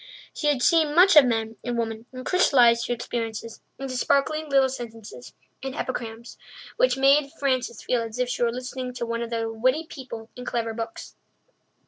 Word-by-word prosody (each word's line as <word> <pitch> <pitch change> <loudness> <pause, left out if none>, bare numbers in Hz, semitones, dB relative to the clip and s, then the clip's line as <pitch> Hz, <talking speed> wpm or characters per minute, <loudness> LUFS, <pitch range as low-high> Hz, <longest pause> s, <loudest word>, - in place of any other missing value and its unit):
She 300 - -2
had 280 -4 +2
seen 315 -3 +3
much 365 +1 +7
of 295 -3 +9
men 225 -2 -1
and 240 -1 -2
women 225 0 -3
and 255 0 -8
crystallized 245 -10 +4
her 245 - 0
experiences 230 -1 -5 0.2
into 270 -1 -5
sparkling 290 +4 +1
little 270 -1 +4
sentences 225 - -9 0.3
and 265 0 -5
epigrams 235 -2 -5 0.4
which - - +2
made 275 +1 +4
Frances 255 -5 -1
feel 245 -2 0
as 225 0 -6
if 250 0 0
she 245 - -3
were 235 -1 +3
listening 250 0 -6
to 240 -1 -3
one 230 0 -3
of 235 - -4
the 225 -1 -2
witty 255 +8 +1
people 240 -7 -9
in 250 - -8
clever 230 -2 -2
books. 225 0 -7
245 Hz, 180 wpm, -25 LUFS, 230-270 Hz, 0.4 s, of